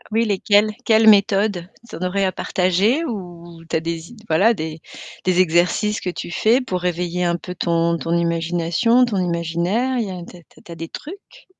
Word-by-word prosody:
Ah - - -21
oui, 225 +2 +2
lesquelles? 205 +1 +2
Quelles 220 -1 +5
méthodes? 200 -3 +3 0.2
Tu - - -11
en - - -10
aurais 185 +2 0
à 185 - 0
partager 195 - +1
ou 175 - -8
tu - - +1
as 160 - +1
des 165 0 -5
i 240 - -14
voilà 195 +9 +4
des 160 -4 -6 0.4
des 185 0 +2
exercices 180 +5 +2
que 180 - -3
tu 175 - -7
fais 230 +8 +3
pour 185 -8 -3
réveiller 180 0 -2
un 170 0 +1
peu 180 +1 -8
ton 170 -1 +1
ton 165 +2 -1
imagination, 170 +8 +1
ton 225 -5 -2
imaginaire? 175 +8 -1
Il 220 - -1
y - - -6
a 185 - -6
tu - - -13
as - - -17
tu - - -24
as - - -19
tu 170 - -12
as - - -8
des 165 0 -6
trucs? 400 +9 -11
180 Hz, 215 wpm, -20 LUFS, 170-215 Hz, 0.4 s, Quelles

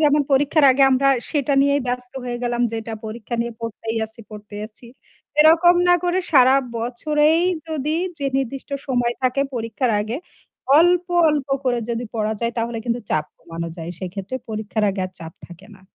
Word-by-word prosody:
যেমন 295 -1 +4
পরীক্ষার 290 +2 +3
আগে 270 +1 +3
আমরা 270 +1 +3 0.2
সেটা 290 -2 0
নিয়েই 280 +1 +2
ব্যস্ত 250 0 -4
হয়ে 240 -1 -4
গেলাম 240 0 0
যেটা 225 0 -5
পরীক্ষা 220 +1 -6
নিয়ে 235 0 -2
পড়তেই 225 0 -4
আছি, 220 +1 -13
পড়তেই 210 -1 -9
আছি। 225 +2 -16 0.5
এরকম 330 +3 +6
না 355 - +7
করে 355 +1 +1
সারা 260 -2 +6 0.2
বছরেই 300 +7 +1 0.3
যদি 305 0 -1 0.2
যে 280 - -2
নির্দিষ্ট 270 +1 -4 0.2
সময় 245 -3 0
থাকে 255 +2 +1
পরীক্ষার 230 +1 -1
আগে 220 +4 -3 0.6
অল্প, 350 +1 +4 0.2
অল্প 295 -3 0 0.2
করে 245 -2 +1
যদি 235 +1 -2
পড়া 215 -1 0
যায় 235 0 -1
তাহলে 230 0 -2
কিন্তু 240 0 -1
চাপ 155 -1 +1
কমানো 170 0 -6
যায়। 165 +1 -6
সেক্ষেত্রে 190 +6 -5
পরীক্ষার 215 0 -2
আগে 195 - -4
আর - - -13
চাপ 160 0 -9
থাকে 175 +2 -14
না। - - -22
245 Hz, 175 wpm, -21 LUFS, 220-280 Hz, 0.6 s, না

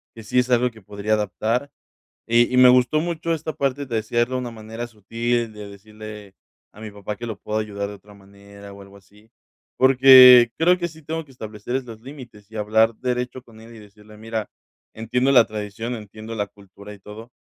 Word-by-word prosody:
que 115 - -10
sí 115 +4 -3
es 125 0 +2
algo 125 +1 +3
que 110 -3 -18
podría 100 +2 -3
adaptar 110 +6 -1 0.6
y 120 +1 +3
y - - +3
me 125 0 +8
gustó 125 +4 +3
mucho 165 0 -2
esta 160 0 -5
parte 140 0 -2
de 120 -4 -4
decirle 115 +2 0
de 130 +2 -7
una 125 -1 -4
manera 110 +1 -8
sutil, 115 +1 -3
de 105 -1 -10
decirle 105 0 -12 0.4
a 105 - -16
mi 110 -1 -8
papá 100 0 -7
que 120 - -7
lo 110 -3 -5
puedo 105 0 -3
ayudar 100 -2 -4
de 105 - -8
otra 105 +1 -19
manera 100 0 -15
o 100 - -13
algo 100 0 -15
así, 105 +3 -22 0.5
porque 130 -2 +8
creo 180 +3 +3
que 175 -1 -2
sí 160 -1 -16
tengo 160 +1 -5
que - - -21
establecer 110 0 -6
es 135 - -4
los 115 -3 -11
límites 120 -6 -13
y 110 - -11
hablar 110 +2 +2
derecho 125 +1 -3
con 115 -3 -18
él 115 +1 -14
y - - -13
decirle: 105 +1 -17
"Mira, 110 0 -5 0.5
entiendo 125 +4 0
la 125 -4 +6
tradición, 110 +2 -6
entiendo 110 0 -9
la 105 -2 -2
cultura 100 +1 -14
y - - -16
todo, 110 +4 -12
110 Hz, 210 wpm, -22 LUFS, 105-125 Hz, 0.6 s, me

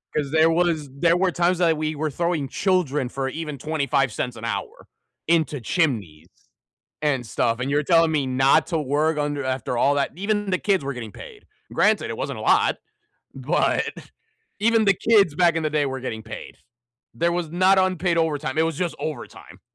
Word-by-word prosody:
'Cause 145 -2 -1
there 160 +1 +4
was 165 -4 0
there 165 +5 +2
were 180 0 +1
times 175 +1 +1
that 165 -3 +3
we 155 0 -2
were 155 +1 -2
throwing 170 -1 -1
children 165 -9 0
for 135 0 -3
even 155 0 -5
25¢ 135 -5 -1
an 110 - -11
hour 100 -4 -5 0.4
into 155 -5 +1
chimneys 110 - -1 0.7
and 135 -5 0
stuff, 115 +1 -1
and 135 +2 -2
you're 150 +1 +1
telling 165 0 +4
me 145 -4 0
not 130 +1 +3
to 165 - -1
work 150 +2 0
under 145 -1 -2
after 130 -2 -2
all 140 +3 +3
that. 140 - 0
Even 205 0 -1
the 185 - +1
kids 195 -6 0
were 140 +1 -3
getting 115 -4 -8
paid. 430 -4 -12 0.3
Granted, - - +2
it - - -5
wasn't - - -4
a - - -6
lot, - - +3 0.6
but - - 0 0.8
even 225 0 +3
the 195 - +5
kids 200 -7 +3
back 170 -1 +3
in 165 - 0
the 155 - -1
day 150 -1 +1
were 130 -1 -4
getting 110 -3 -5
paid. 110 0 -9 0.6
There 170 +1 +1
was 175 -2 -3
not 185 +3 +4
unpaid 185 -2 +1
overtime, 150 -4 -1
it 160 - +4
was 165 -2 -2
just 175 -2 -2
overtime. 155 -2 -7
155 Hz, 190 wpm, -23 LUFS, 135-175 Hz, 0.8 s, the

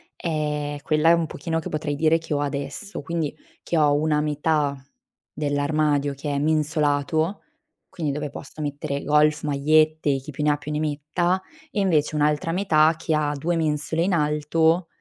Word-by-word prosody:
è 150 -3 -2
quella 155 +2 +3
un 165 -1 -1
pochino 165 +2 -3
che 160 - -6
potrei 150 -1 -2
dire 155 +2 +3
che 165 -1 -5
ho 145 - 0
adesso, 145 +8 -4
quindi, 165 -3 -2 0.3
che 170 - -2
ho 150 -2 +4
una 150 0 +1
metà 150 -1 0 0.6
dell'armadio 145 0 0
che 140 +2 -6
è 140 - 0
mensolato, 155 +3 +1 0.5
quindi 155 -4 -3
dove 150 +1 -3
posso 145 +2 -9
mettere 145 -1 -3
golf, 150 +1 +3
magliette, 155 0 +2
chi 135 +3 -8
più 150 +2 -4
ne 150 0 +3
più 150 +1 -7
ne 150 - -1
metta, 155 +5 -1 0.3
e 215 - -2
invece 160 -6 +2
un'altra 150 +2 +1
metà 165 -4 +3
che 160 -1 -1
ha 150 -1 0
2 170 +5 -1
mensole 160 +1 0
in 185 +1 +1
alto, 160 +2 +2
150 Hz, 165 wpm, -24 LUFS, 145-160 Hz, 0.6 s, ho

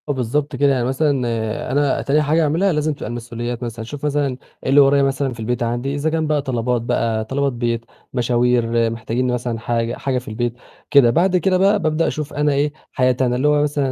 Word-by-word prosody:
آه، - - +3
بالضبط 135 +3 -1
كده. 140 -1 +3
يعني 125 -2 0
مثلًا، 135 +4 +1 0.6
أنا 145 0 +1
تاني 150 +2 +2
حاجة 155 +2 +2
اعملها 165 +6 +2
لازم 150 0 0
تبقى 140 - -7
المسؤوليات 120 +1 -5
مثلًا، 115 -1 -5
أشوف 145 +4 -7
مثلًا 145 -3 0 0.3
إيه - - -2
اللي 140 +2 +6
ورايا 140 0 +4
مثلًا، 135 -1 0
في 120 - -13
البيت 120 +2 -2
عندي، 120 +4 -2
إذا 145 +2 0
كان 160 0 -1
بقى 150 -1 +1
طلبات 125 -3 -1
بقى 115 -1 -1
طلبات 140 +2 -1
بيت، 115 -1 -2 0.3
مشاوير 120 -2 +2
محتاجين 115 +2 -2
مثلًا 120 -2 -3
حاجة 115 0 -1
حاجة 135 -2 -1
في 125 - -6
البيت 120 +2 -2 0.4
كده، 140 -4 +6
بعد 180 +8 +3
كده 185 +1 +2
بقى 200 +3 +3
بابدأ 155 -1 +1
أشوف 150 -1 -4
أنا 150 0 +1
إيه، 145 +1 0 0.2
حياتي 130 0 +1
أنا 125 0 0
اللي 130 +4 +1
هو 150 0 +3
مثلًا 145 -2 0
130 Hz, 210 wpm, -20 LUFS, 120-145 Hz, 0.6 s, اللي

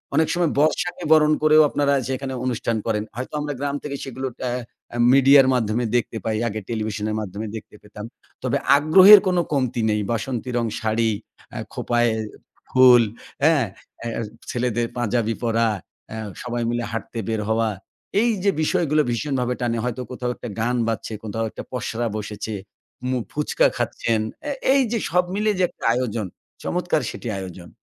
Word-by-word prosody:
অনেক 160 +1 +4
সময় 175 -3 +1
বর্ষাকে 170 +4 +1
বরণ 155 -1 +5
করেও 155 0 +7
আপনারা 140 0 +1 0.2
সেখানে 130 0 -3
অনুষ্ঠান 115 -2 -1
করেন। 105 -2 0
হয়তো 125 +4 -6
আমরা 145 0 -3
গ্রাম 140 0 -1
থেকে 140 -1 -4
সেগুলো 130 0 -4
ট্যাঁ 125 0 -2 0.3
অ্যা 120 - -5
মিডিয়ার 135 0 +7
মাধ্যমে 115 -1 0
দেখতে 120 -1 0
পাই। 110 -1 0
আগে 110 -1 -3
টেলিভিশনের 110 -1 -2
মাধ্যমে 105 +1 -5
দেখতে 110 - -9
পেতাম। 105 0 -9 0.4
তবে - - +1 0.2
আগ্রহের 190 +8 +9
কোনো 180 -1 +3
কমতি 125 -4 0
নেই। 105 0 +1
বাসন্তী 120 +2 -2
রং 120 - +1
শাড়ি, 110 +1 +1 0.4
আ - - -4 0.2
খোঁপায় 120 -1 +1 0.6
ফুল, 125 -2 +7 0.4
হ্যাঁ? 150 -5 +4 0.4
অ্যা 115 - -3 0.4
ছেলেদের 120 -1 0
পাঞ্জাবি 115 -1 0
পরা, 115 0 +2 0.4
অ্যা 110 - -6 0.2
সবাই 120 -1 -3
মিলে 120 0 -1
হাঁটতে 115 +1 -5
বের 110 -1 -1
হওয়া। 110 0 +2 0.5
এই 240 - +3
যে 200 - +4
বিষয়গুলো, 155 -2 +2
ভীষণভাবে 125 0 -1
টানে। 120 -1 0
হয়তো 125 +1 -3
কোথাও 125 -1 -3
একটা 120 - -7
গান 120 +2 +1
বাজছে, 115 0 -3
কোথাও 110 +1 -2
একটা - - -8
পসরা 120 -1 -2
বসেছে, 105 +1 -5 0.6
মু 130 - +1
ফুচকা 150 0 +2
খাচ্ছেন। 115 -2 0 0.2
অ্যা 290 -1 -2 0.2
এই 275 - +4
যে 235 - +1
সব 180 +1 +4
মিলে 210 +1 +2
যে 185 - +2
একটা - - -17
আয়োজন, 115 -4 -2 0.4
চমৎকার 175 -4 0
সেটি - - -8
আয়োজন। 90 -2 -8
120 Hz, 160 wpm, -23 LUFS, 115-145 Hz, 0.6 s, আগ্রহের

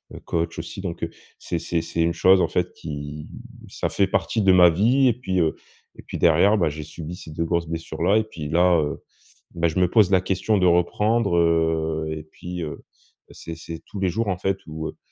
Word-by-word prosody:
heu, - - -8
coach 85 0 -2
aussi, - - -6
donc 90 -3 -5
heu, - - -1 0.3
c'est 85 - -3
c'est 85 0 -1
c'est 85 - -2
une 85 0 +2
chose, 95 0 +5
en 85 - +2
fait, - - -1
qui 75 0 -7 0.4
ça - - -3
fait 100 - +1
partie 110 +3 0
de 95 -2 +5
ma 90 -1 +7
vie 120 +10 +3
et 120 - +4
puis 95 -6 -2
heu 80 -1 +1 0.4
et - - -12
puis - - -6
derrière, 85 +6 +4
bah, 85 -5 +2
j'ai 75 +1 -6
subi 80 +2 -8
ces 80 - -11
2 85 +2 -2
grosses 85 -1 -1
blessures-là, 80 +4 0
et 110 - +2
puis 80 -9 -7
là, 85 0 +4
heu, 75 - -4 0.5
beh, 85 0 +1
je 80 - -5
me 90 - +4
pose 105 -2 +4
la 95 -2 +4
question 95 +3 0
de 90 - +2
reprendre, 100 +3 +2
heu 80 -1 +1
et 80 -1 -5
puis 90 +2 -7
heu, 75 -2 -7 0.5
c'est 85 - -8
c'est 80 0 -8
tous 100 - -8
les 95 -1 +1
jours, 110 +5 -1
en 90 - -1
fait, 95 +1 0
où 80 0 -5
heu, - - -11
85 Hz, 225 wpm, -23 LUFS, 80-95 Hz, 0.5 s, ma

